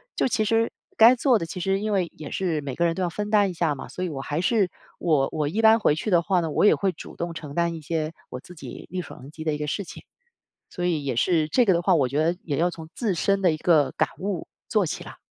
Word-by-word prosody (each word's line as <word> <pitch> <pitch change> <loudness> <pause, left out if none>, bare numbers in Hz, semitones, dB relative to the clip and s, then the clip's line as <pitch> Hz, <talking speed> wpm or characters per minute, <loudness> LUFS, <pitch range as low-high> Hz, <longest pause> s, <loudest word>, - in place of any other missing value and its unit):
就 - - +1
其 225 -3 0
实 225 +1 +2 0.3
该 230 +3 +8
做 250 -2 +3
的， 165 - -3
其 165 - -7
实 195 +2 0
因 215 +1 -2
为 185 -4 0
也 150 - -8
是 170 -5 -1
每 135 -3 -5
个 170 - +1
人 165 - +2
都 185 - -4
要 180 - +1
分 205 +5 -4
担 205 -2 +4
一 - - -5
下 165 -3 0
嘛， 140 - -8
所 185 - -4
以 - - -3
我 140 -4 -5
还 145 +3 -3
是， 195 +1 +2 0.3
我 150 -5 +2
我 150 -2 -1
一 200 +10 -1
般 220 +1 +7
回 175 -8 +3
去 155 - -3
的 175 -2 +5
话 180 +1 +1
呢， 165 -2 -3
我 - - +1
也 - - +6
会 195 -1 0
主 160 - -11
动 170 0 -4
承 150 -3 -8
担 170 0 +1
一 160 - -8
些 155 +1 -2 0.2
我 125 - -6
自 175 - -13
己 165 - -9
力 185 0 -2
所 - - -11
能 135 +3 -12
及 155 0 -8
的 155 -1 0
一 - - -4
个 150 - -3
事 200 +7 -2
情。 - - -11 0.7
所 175 - -4
以 160 -5 0
也 130 - -1
是 160 +5 +2
这 250 - +3
个 195 - +4
的 170 - +1
话， 185 - +4
我 140 -5 +2
觉 140 - -2
得 170 +2 +1
也 145 -4 -2
要 175 +2 +2
从 160 -2 -10
自 220 -6 0
身 195 +3 +1
的 180 - +5
一 155 - -2
个 155 -5 +3
感 - - +1
悟 190 -2 -4 0.2
做 210 -4 +2
起 - - -5
了。 - - -11
170 Hz, 315 characters per minute, -25 LUFS, 155-195 Hz, 0.7 s, 该